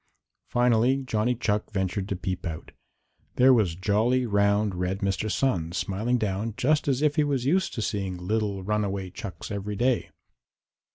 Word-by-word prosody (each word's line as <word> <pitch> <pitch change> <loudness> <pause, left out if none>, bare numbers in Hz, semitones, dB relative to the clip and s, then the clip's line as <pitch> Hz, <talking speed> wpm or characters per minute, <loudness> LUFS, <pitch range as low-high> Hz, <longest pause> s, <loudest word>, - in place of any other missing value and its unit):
Finally 125 +2 +2
Johnny 120 0 0
Chuck 105 -3 -1
ventured 95 -1 -2
to 100 - -1
peep 90 0 -4
out. 80 -1 -7 0.6
There 130 +1 +6
was 100 -9 +2
jolly, 110 +7 +1
round, 100 -1 +2
red 90 +2 -2
Mr. 100 +2 -1
Sun 85 -12 0
smiling 105 +6 0
down 105 0 -2
just 150 +3 +2
as 135 +1 +1
if 150 -1 +2
he 150 - +5
was 140 -4 -1
used 185 +7 +1
to 115 - -2
seeing 95 -4 -2
little 100 +1 -2
runaway 100 -2 -1
chucks 95 +1 -7
every 100 0 -3
day. 125 +3 +1
105 Hz, 160 wpm, -26 LUFS, 95-125 Hz, 0.6 s, There